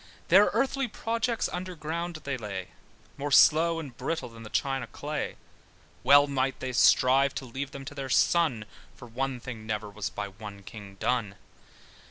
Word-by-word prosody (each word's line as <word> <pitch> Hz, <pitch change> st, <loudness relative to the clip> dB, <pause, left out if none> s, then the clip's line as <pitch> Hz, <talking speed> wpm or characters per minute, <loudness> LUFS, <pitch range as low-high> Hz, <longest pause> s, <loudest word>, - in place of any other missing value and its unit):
Their -, -, +8 dB
earthy 270 Hz, -1 st, 0 dB
projects 230 Hz, +1 st, -1 dB
under 180 Hz, 0 st, -5 dB
ground 170 Hz, +2 st, -4 dB
they 140 Hz, -1 st, -2 dB
lay, 100 Hz, -6 st, -6 dB, 0.5 s
More 145 Hz, +1 st, -3 dB
slow 165 Hz, +4 st, +6 dB
and 140 Hz, -7 st, -8 dB
brittle 160 Hz, +3 st, -3 dB
than 115 Hz, 0 st, -13 dB
the 110 Hz, -, -9 dB
China 135 Hz, -1 st, -1 dB
clay: 150 Hz, +4 st, -4 dB, 0.7 s
Well 145 Hz, 0 st, +7 dB
may 135 Hz, -2 st, 0 dB
they 130 Hz, -1 st, -5 dB
strive 130 Hz, +2 st, +4 dB
to 135 Hz, -, -4 dB
leave 135 Hz, +3 st, -5 dB
them 140 Hz, -1 st, -9 dB
to 145 Hz, -, -7 dB
their 135 Hz, -2 st, -5 dB
son, 135 Hz, -7 st, +2 dB, 0.3 s
For 120 Hz, -, -12 dB
one 130 Hz, +2 st, -3 dB
thing 120 Hz, -3 st, -8 dB
never 105 Hz, -1 st, -3 dB
was 105 Hz, 0 st, -4 dB
by 100 Hz, -1 st, -5 dB
one 100 Hz, 0 st, -10 dB
king 100 Hz, -1 st, -10 dB
done. 105 Hz, -1 st, -1 dB
135 Hz, 170 wpm, -28 LUFS, 110-155 Hz, 0.7 s, Their